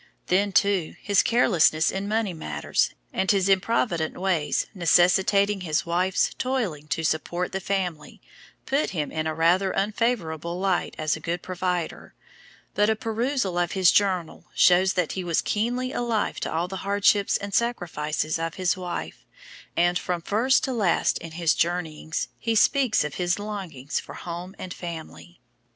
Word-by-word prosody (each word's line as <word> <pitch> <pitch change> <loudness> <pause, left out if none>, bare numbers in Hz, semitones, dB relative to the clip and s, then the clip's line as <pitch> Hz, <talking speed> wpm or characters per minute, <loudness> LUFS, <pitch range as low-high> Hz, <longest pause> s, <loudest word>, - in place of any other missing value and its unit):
Then, 200 +3 +2
too, 195 -3 +2
his 200 -2 +3
carelessness 175 -9 +3
in 195 +1 -3
money 215 -2 0
matters, 75 - -1 0.2
and 190 - 0
his 195 -2 +3
improvident 190 -4 +1
ways, 180 -5 0
necessitating 190 +3 +3
his 155 -4 -1
wife's 180 +2 +1
toiling 215 - -2
to 165 - -2
support 175 +3 -1
the 190 - -2
family, 185 -5 -3 0.5
put 275 +3 0
him 150 - -2
in 155 0 -2
a 155 - -2
rather 175 +4 +3
unfavourable 185 -6 -1
light 190 -2 0
as 155 -1 0
a - - -8
"good 170 +3 -3
provider," 180 -2 -3 0.6
but 210 +1 +2
a 220 - +2
perusal 225 -4 -1
of 175 -1 0
his 185 -2 +5
journal 185 -5 0
shows 185 +1 +5
that 180 -4 0
he 190 - -4
was 170 -2 0
keenly 245 +4 -1
alive 230 -5 -1
to - - -3
all 165 +2 -1
the 190 +1 -5
hardships 200 +1 +2
and 200 0 -7
sacrifices 160 -9 -1
of 165 0 -3
his 185 -2 +1
wife, 175 - -6 0.5
and 175 +1 +3
from 175 -2 -3
first 240 +8 +2
to 265 - -1
last 205 -8 +1
in 165 -1 -9
his 165 -1 +2
journeyings 160 -2 -2
he 230 -1 -1
speaks 255 - +3
of 150 -2 -4
his 175 0 +1
longings 190 -10 -4
for - - -10
home 175 +2 -7
and 185 -2 -6
family. 160 - -9
180 Hz, 160 wpm, -25 LUFS, 165-205 Hz, 0.6 s, his